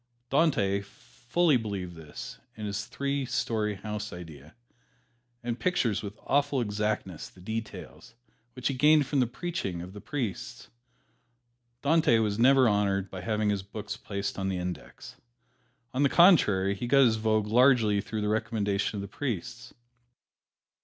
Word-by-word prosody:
Dante 120 Hz, -10 st, +2 dB
fully 125 Hz, -, 0 dB
believed 100 Hz, -6 st, -5 dB
in 80 Hz, +6 st, -9 dB
this 105 Hz, +1 st, -3 dB
three 140 Hz, 0 st, -2 dB
story 115 Hz, -4 st, -1 dB
house 105 Hz, +1 st, -5 dB
idea, 80 Hz, -4 st, -11 dB, 0.9 s
and 120 Hz, 0 st, -3 dB
pictures 125 Hz, -, +1 dB
with 105 Hz, 0 st, -7 dB
awful 140 Hz, 0 st, +2 dB
exactness 105 Hz, -5 st, -2 dB
the -, -, -20 dB
details, 110 Hz, +3 st, -7 dB, 0.4 s
which 125 Hz, 0 st, -3 dB
he -, -, -1 dB
gained 150 Hz, +2 st, +5 dB
from 140 Hz, +1 st, 0 dB
the 125 Hz, -, +3 dB
preaching 125 Hz, -, -4 dB
of 90 Hz, +2 st, -8 dB
the 105 Hz, -, -9 dB
priests. 120 Hz, -11 st, -5 dB, 1.1 s
Dante 155 Hz, -4 st, +4 dB
was 105 Hz, -1 st, 0 dB
never 130 Hz, +1 st, +6 dB
honored 100 Hz, -2 st, +1 dB
by 95 Hz, -, -6 dB
having 105 Hz, +2 st, 0 dB
his 100 Hz, -1 st, -1 dB
books 105 Hz, +2 st, -6 dB
placed 100 Hz, -2 st, -4 dB
on 95 Hz, 0 st, -1 dB
the 95 Hz, -, -1 dB
"Index." 90 Hz, -1 st, -7 dB, 0.8 s
On 130 Hz, -, 0 dB
the 140 Hz, -, +4 dB
contrary, 105 Hz, -, +5 dB
he 110 Hz, +5 st, -4 dB
got 135 Hz, +2 st, +6 dB
his 110 Hz, -2 st, +3 dB
vogue 110 Hz, -1 st, +1 dB
largely 115 Hz, -3 st, +4 dB
through 110 Hz, +1 st, -4 dB
the 105 Hz, -, -1 dB
recommendation 105 Hz, -2 st, -1 dB
of -, -, -3 dB
the 100 Hz, -, -6 dB
priests. 115 Hz, +1 st, -5 dB
110 Hz, 145 wpm, -28 LUFS, 100-130 Hz, 1.1 s, never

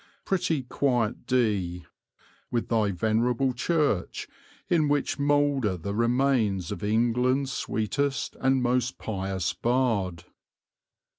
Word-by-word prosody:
Pretty 175 Hz, -7 st, 0 dB
quiet 120 Hz, -3 st, -1 dB
D, 100 Hz, -9 st, 0 dB, 0.6 s
with 120 Hz, -1 st, -2 dB
thy 110 Hz, -3 st, +2 dB
venerable 115 Hz, +7 st, +1 dB
church 145 Hz, -, 0 dB, 0.4 s
in 160 Hz, -4 st, +2 dB
which 145 Hz, 0 st, 0 dB
moulder 140 Hz, -8 st, +2 dB
the 100 Hz, +4 st, -4 dB
remains 115 Hz, -5 st, +1 dB
of -, -, -5 dB
England's 125 Hz, +5 st, +1 dB
sweetest 135 Hz, +6 st, -2 dB
and 130 Hz, -1 st, +2 dB
most 125 Hz, +1 st, 0 dB
pious 95 Hz, -3 st, -2 dB
bard." 110 Hz, -9 st, 0 dB
120 Hz, 100 wpm, -27 LUFS, 105-135 Hz, 0.6 s, thy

